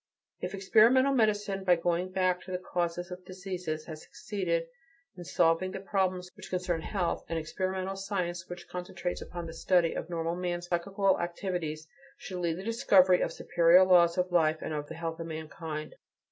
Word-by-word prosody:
If -, -, -4 dB
experimental 230 Hz, +7 st, +5 dB
medicine, 210 Hz, -5 st, +1 dB
by 180 Hz, -2 st, +5 dB
going 175 Hz, +2 st, 0 dB
back 185 Hz, -1 st, +1 dB
to 185 Hz, -, -10 dB
the 180 Hz, -, 0 dB
causes 175 Hz, -1 st, -3 dB
of 180 Hz, 0 st, -7 dB
diseases, 180 Hz, -4 st, -5 dB
has 155 Hz, -2 st, -8 dB
succeeded 220 Hz, -, -2 dB, 0.5 s
in 180 Hz, -, -8 dB
solving 165 Hz, +4 st, +2 dB
the 195 Hz, -, -4 dB
problems 190 Hz, -2 st, -1 dB
which -, -, -11 dB
concern 180 Hz, -2 st, -1 dB
health, 180 Hz, 0 st, -2 dB
an 165 Hz, -, -1 dB
experimental 185 Hz, +4 st, -2 dB
science 185 Hz, -3 st, -3 dB
which 175 Hz, 0 st, -8 dB
concentrates 180 Hz, 0 st, -4 dB
upon 175 Hz, -1 st, -6 dB
the 165 Hz, -, -7 dB
study 170 Hz, 0 st, +2 dB
of 165 Hz, -, -5 dB
normal 165 Hz, 0 st, -2 dB
man's 175 Hz, -1 st, -3 dB
psychical 195 Hz, +3 st, +1 dB
activities 170 Hz, -3 st, -3 dB, 0.3 s
should 185 Hz, -2 st, -6 dB
lead 170 Hz, -2 st, 0 dB
to -, -, -9 dB
the 190 Hz, -, -6 dB
discovery 195 Hz, -5 st, +4 dB
of -, -, +1 dB
the -, -, -10 dB
superior 175 Hz, +1 st, +5 dB
laws 175 Hz, -2 st, +5 dB
of 180 Hz, 0 st, 0 dB
life 160 Hz, -3 st, +3 dB
and 160 Hz, -, -3 dB
of 150 Hz, -1 st, -3 dB
the 160 Hz, -, -8 dB
health 165 Hz, 0 st, -4 dB
of 165 Hz, -, -5 dB
mankind. 155 Hz, -1 st, -6 dB
180 Hz, 185 wpm, -30 LUFS, 170-190 Hz, 0.5 s, experimental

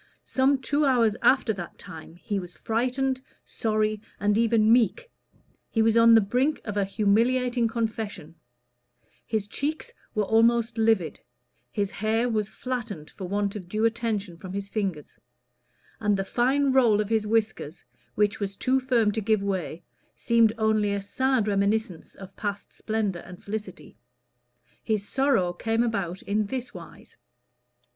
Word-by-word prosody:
Some 270 Hz, +1 st, +2 dB
two 285 Hz, +3 st, 0 dB
hours 240 Hz, -6 st, +3 dB
after 255 Hz, -4 st, +3 dB
that 175 Hz, -4 st, -8 dB
time 160 Hz, +1 st, -11 dB
he 200 Hz, +3 st, -3 dB
was 180 Hz, -1 st, -9 dB
frightened, 255 Hz, +3 st, -1 dB, 0.2 s
sorry, 215 Hz, -1 st, -1 dB, 0.2 s
and 205 Hz, 0 st, +2 dB
even 225 Hz, -1 st, +4 dB
meek; 360 Hz, -, +1 dB, 0.6 s
he 225 Hz, -, +2 dB
was 225 Hz, 0 st, +3 dB
on 230 Hz, 0 st, +7 dB
the 225 Hz, -, +7 dB
brink 255 Hz, +9 st, 0 dB
of 210 Hz, -, -4 dB
a 205 Hz, -, +2 dB
humiliating 235 Hz, +4 st, +2 dB
confession; 220 Hz, -8 st, -4 dB, 0.9 s
his 215 Hz, -2 st, -1 dB
cheeks 305 Hz, -, -3 dB, 0.2 s
were 215 Hz, -, +2 dB
almost 230 Hz, +2 st, +2 dB
livid; 220 Hz, -7 st, +2 dB, 0.5 s
his 200 Hz, -2 st, -1 dB
hair 220 Hz, +3 st, 0 dB
was 215 Hz, -3 st, -1 dB
flattened 230 Hz, -10 st, -5 dB
for 185 Hz, -, -7 dB
want 200 Hz, +1 st, -1 dB
of 185 Hz, -4 st, -7 dB
due 215 Hz, +3 st, 0 dB
attention 220 Hz, -6 st, -1 dB
from 185 Hz, +2 st, -9 dB
his 200 Hz, 0 st, -4 dB
fingers; 195 Hz, -9 st, -4 dB, 0.8 s
and 210 Hz, -2 st, +1 dB
the 195 Hz, -, -2 dB
fine 265 Hz, +6 st, +2 dB
roll 235 Hz, -6 st, +4 dB
of 210 Hz, -1 st, -1 dB
his 220 Hz, -2 st, +1 dB
whiskers, 215 Hz, -7 st, -1 dB, 0.3 s
which 210 Hz, 0 st, +1 dB
was 195 Hz, -1 st, -3 dB
too 260 Hz, +5 st, +1 dB
firm 245 Hz, -5 st, +2 dB
to 220 Hz, -, -2 dB
give 215 Hz, -1 st, +1 dB
way, 185 Hz, -4 st, -3 dB, 0.3 s
seemed 230 Hz, -2 st, +3 dB
only 215 Hz, -2 st, +2 dB
a 200 Hz, -, -1 dB
sad 255 Hz, +3 st, 0 dB
reminiscence 200 Hz, -2 st, -1 dB
of 195 Hz, 0 st, -12 dB
past 205 Hz, -1 st, -5 dB
splendor 215 Hz, -5 st, -2 dB
and 180 Hz, +1 st, -12 dB
felicity. 210 Hz, +1 st, -7 dB, 0.8 s
His 210 Hz, -3 st, -1 dB
sorrow 265 Hz, -10 st, +1 dB
came 225 Hz, +5 st, 0 dB
about 195 Hz, -6 st, -2 dB
in 210 Hz, +1 st, 0 dB
this 255 Hz, +2 st, -4 dB
wise. -, -, -13 dB
220 Hz, 150 wpm, -26 LUFS, 200-235 Hz, 0.9 s, on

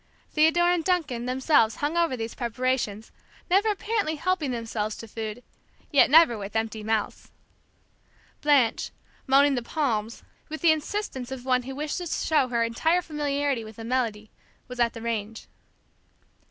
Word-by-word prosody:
Theodore 325 Hz, +3 st, +4 dB
and 350 Hz, -2 st, +1 dB
Duncan 300 Hz, -10 st, -1 dB
themselves 255 Hz, -3 st, +3 dB
hung 295 Hz, +3 st, -2 dB
over 335 Hz, -6 st, +1 dB
these 225 Hz, 0 st, -4 dB
preparations; 240 Hz, -3 st, -2 dB, 0.4 s
never 400 Hz, +4 st, +4 dB
apparently 415 Hz, -5 st, -1 dB
helping 340 Hz, -2 st, -1 dB
themselves 225 Hz, -3 st, -3 dB
to 230 Hz, -, -9 dB
food, 220 Hz, +2 st, -6 dB, 0.5 s
yet 280 Hz, -, +5 dB
never 295 Hz, -7 st, +6 dB
with 200 Hz, +2 st, -7 dB
empty 220 Hz, -1 st, -2 dB
mouths. 220 Hz, -1 st, -2 dB, 1.1 s
Blanche, 280 Hz, -6 st, +3 dB, 0.4 s
moaning 280 Hz, +2 st, +5 dB
"The 250 Hz, -, -1 dB
Palms" 230 Hz, -5 st, -2 dB, 0.3 s
with 315 Hz, 0 st, -6 dB
the 335 Hz, -, +6 dB
insistence 310 Hz, -5 st, -3 dB
of 260 Hz, -1 st, -7 dB
one 255 Hz, -1 st, +2 dB
who 265 Hz, +2 st, -7 dB
wishes 305 Hz, +4 st, -3 dB
to -, -, -3 dB
show 295 Hz, -5 st, +3 dB
her 235 Hz, -2 st, 0 dB
entire 320 Hz, +10 st, +1 dB
familiarity 285 Hz, -5 st, -1 dB
with 220 Hz, -1 st, -11 dB
a 225 Hz, -, -7 dB
melody, 225 Hz, -3 st, -2 dB, 0.4 s
was 250 Hz, -1 st, -9 dB
at 235 Hz, -1 st, +2 dB
the 230 Hz, -, -9 dB
range. 225 Hz, -1 st, -4 dB
255 Hz, 155 wpm, -26 LUFS, 230-310 Hz, 1.1 s, never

